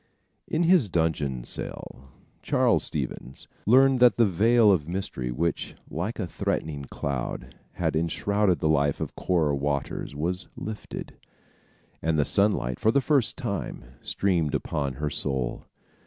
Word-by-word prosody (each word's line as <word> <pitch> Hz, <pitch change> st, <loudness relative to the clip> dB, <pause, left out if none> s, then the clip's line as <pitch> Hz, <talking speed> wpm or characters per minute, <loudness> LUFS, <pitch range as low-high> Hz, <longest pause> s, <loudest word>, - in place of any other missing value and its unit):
In 160 Hz, -, +1 dB
his 165 Hz, -, +4 dB
dungeon 75 Hz, -7 st, 0 dB
cell, 65 Hz, +2 st, -6 dB, 0.3 s
Charles -, -, +2 dB
Stevens 65 Hz, -, -5 dB, 0.2 s
learned 130 Hz, +3 st, +6 dB
that 125 Hz, -1 st, +6 dB
the 115 Hz, -, +5 dB
veil 110 Hz, +4 st, +4 dB
of 80 Hz, -6 st, +1 dB
mystery 85 Hz, -9 st, -3 dB
which, 80 Hz, +8 st, -2 dB, 0.2 s
like 90 Hz, +9 st, -3 dB
a -, -, -2 dB
threatening 75 Hz, -4 st, -3 dB
cloud, 70 Hz, -1 st, -4 dB, 0.2 s
had -, -, -1 dB
enshrouded 95 Hz, +4 st, +1 dB
the -, -, +2 dB
life 70 Hz, -2 st, +2 dB
of -, -, -4 dB
Cora 80 Hz, -6 st, +1 dB
Waters 70 Hz, 0 st, -2 dB
was 90 Hz, +5 st, -2 dB
lifted, 110 Hz, -2 st, -7 dB, 0.8 s
and 80 Hz, 0 st, +1 dB
the 75 Hz, -, +3 dB
sunlight, 100 Hz, -, +2 dB
for 110 Hz, -, +3 dB
the 140 Hz, -, +4 dB
first 135 Hz, -5 st, +2 dB
time, -, -, -4 dB, 0.2 s
streamed 85 Hz, -7 st, 0 dB
upon 70 Hz, -3 st, -2 dB
her 75 Hz, +3 st, -3 dB
soul. 65 Hz, -3 st, -2 dB
85 Hz, 140 wpm, -26 LUFS, 70-105 Hz, 0.8 s, learned